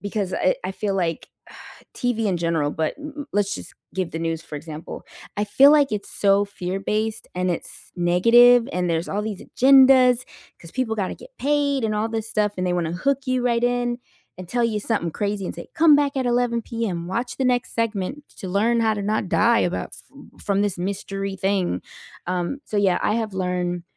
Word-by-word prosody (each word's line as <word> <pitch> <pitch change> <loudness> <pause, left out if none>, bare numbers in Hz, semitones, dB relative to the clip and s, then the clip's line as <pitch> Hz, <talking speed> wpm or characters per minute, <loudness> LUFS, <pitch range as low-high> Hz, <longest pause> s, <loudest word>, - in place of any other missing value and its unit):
because, 200 -2 -3
uh, - - -1
eh, 185 - +3
I 185 - -2
feel, 200 0 -2
like, 170 -4 -1 0.7
TV 235 -3 -1
in 185 - 0
general, 165 -3 0
but 160 0 -2
m 300 0 -8
m 285 - -5
let's, 205 -1 0
just, - - -9 0.2
give 185 -3 -2
the 160 - -5
news, 165 -1 -2
for 155 - -10
example. 155 +1 -8 0.4
I - - +1
feel, 275 +8 +6
like, 290 -4 +4
it's 210 -1 -4
so 200 0 +3
fear-based, 205 +3 -3
and 180 0 0
it's 170 - -6
negative, 230 +8 +5
and 180 0 -1
there's 165 +1 -1
all 205 +1 -2
these 210 -3 -5
agendas, 260 -2 +6 0.4
'cause 165 - -12
people 255 -4 -1
gotta 195 -3 -2
get - - -15
paid 285 -2 +1
and 215 - 0
all 215 +1 0
this 225 -1 -4
stuff, 210 -2 0
and 185 0 -1
they 180 - 0
wanna 170 -2 -1
hook 275 +10 0
you 255 0 +1
right 235 -1 +1
in 245 0 0 0.4
and 185 - -8
tell 240 +2 0
you 220 -2 0
something 205 -6 -1
crazy 200 +2 -2
and - - -5
say, - - -9
"Come 320 -3 +6
back 285 -1 0
at 260 - -1
11 240 -1 +1
PM 200 -8 -3
watch 235 +6 -3
the 265 - 0
next 250 0 0
segment 230 +5 -2
to - - -6
learn 225 +5 +2
how 220 -1 +2
to 205 - -4
not 210 -2 -1
die 235 0 +4
about 175 - -2
sf - - -12 0.4
from 200 -1 +1
this 205 -3 -1
mystery 195 +1 -3
thing." 190 - 0 0.5
um, 180 +9 -2
so 210 - -5
yeah, 195 -3 +3
I - - +1
have 220 -2 -2
learned 180 -1 -2
205 Hz, 210 wpm, -23 LUFS, 180-240 Hz, 0.7 s, feel